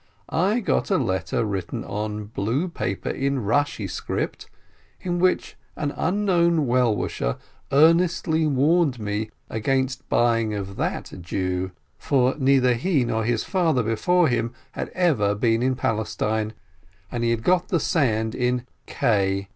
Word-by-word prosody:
I 200 +8 +2
got - - 0
a 195 - +3
letter 105 -3 -1
written 95 -4 -3
on 105 +1 -4
blue 115 - -1
paper - - -3
in 140 -1 -1
Rashi 130 -3 0
script, - - -4 0.5
in 175 -1 -2
which 185 +1 +1 0.2
an 145 -2 -2
unknown 170 -4 +2
well 125 -3 +2
wisher - - -2 0.3
earnestly 160 +1 +3
warned 145 0 +2
me 105 +1 -2 0.2
against 130 +4 -1
buying 115 -2 +2
of 100 -1 -5
that - - -3
Jew, 90 +1 -2 0.3
for 130 -2 +2
neither 130 -2 +4
he 135 +2 +1
nor 110 -1 -1
his 115 0 0
father 165 - +1
before 170 +11 +2
him 120 -1 -1 0.2
had - - -5
ever 130 - +2
been 115 +1 +1
in 130 +1 +1
Palestine, 110 -1 -1 0.6
and 120 -1 -2
he 115 - +2
had 115 -1 0
got 180 +5 +2
the 175 -5 +1
sand 110 - +1
in 125 0 0 0.2
K. 100 -3 0
125 Hz, 140 wpm, -24 LUFS, 110-160 Hz, 0.6 s, neither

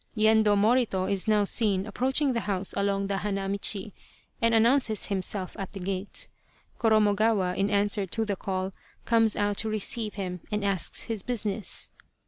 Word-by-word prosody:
Yendo 215 -1 +4
Morito 215 -3 +2
is 195 +2 -1
now 210 -1 +3
seen 200 -2 +1
approaching 260 +6 +1
the 235 - 0
house 195 -3 -2
along 200 0 0
the 195 0 -2
hana 195 -1 -2
michi, 200 +1 0 0.5
and 230 0 +3
announces 230 -1 +3
himself 190 -1 -2
at 195 - -6
the 195 - -7
gate. 190 +1 -4 0.5
Korornogawa, 215 -3 +2
in 195 +2 0
answer 205 -1 +1
to 225 +5 -2
the 205 -2 -2
call, 190 0 -3 0.3
comes 225 -2 +3
out 205 -1 0
to 220 - +2
receive 215 +1 -1
him 180 -3 -4
and 210 -1 -1
asks 195 -4 0
his 225 -3 -2
business. 215 -2 -1
205 Hz, 160 wpm, -27 LUFS, 195-220 Hz, 0.5 s, Yendo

